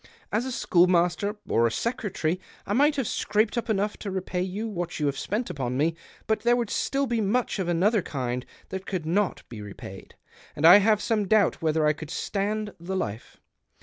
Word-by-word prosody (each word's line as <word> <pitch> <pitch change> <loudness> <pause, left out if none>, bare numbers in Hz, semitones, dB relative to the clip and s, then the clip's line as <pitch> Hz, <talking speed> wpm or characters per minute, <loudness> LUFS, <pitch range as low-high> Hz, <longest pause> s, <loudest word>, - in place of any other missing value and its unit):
As 220 +4 0
a 260 - -3
schoolmaster, 180 0 +2
or 115 +1 +3
a - - -2
secretary, 185 - -2 0.3
I 205 - -2
might 290 +6 +4
have 270 -6 -1
scraped 215 +2 +1
up 235 -1 -2
enough 210 0 0
to 205 - -5
repay 185 -1 -2
you 195 +5 -3
what 175 -6 -4
you 150 - 0
have 140 -1 0
spent 210 - -2
upon 125 -3 -3
me, 160 +4 +2 0.3
but 220 - +1
there 240 +1 +3
would 240 -3 -2
still 275 0 0
be 235 -3 0
much 215 +1 0
of 185 - -1
another 190 +5 +2
kind 125 -5 -3 0.3
that 190 0 -6
could 180 -5 -3
not 190 +4 0
be 110 -3 -8
repaid, 100 -1 -10 0.4
and 150 - 0
I 175 +4 +11
have 210 +1 +3
some 215 -4 0
doubt 210 -2 +3
whether 160 -1 +2
I 150 - +4
could 155 0 -9
stand 205 +3 -2
the 180 +3 -4
life. 110 - -4
190 Hz, 200 wpm, -26 LUFS, 160-215 Hz, 0.4 s, I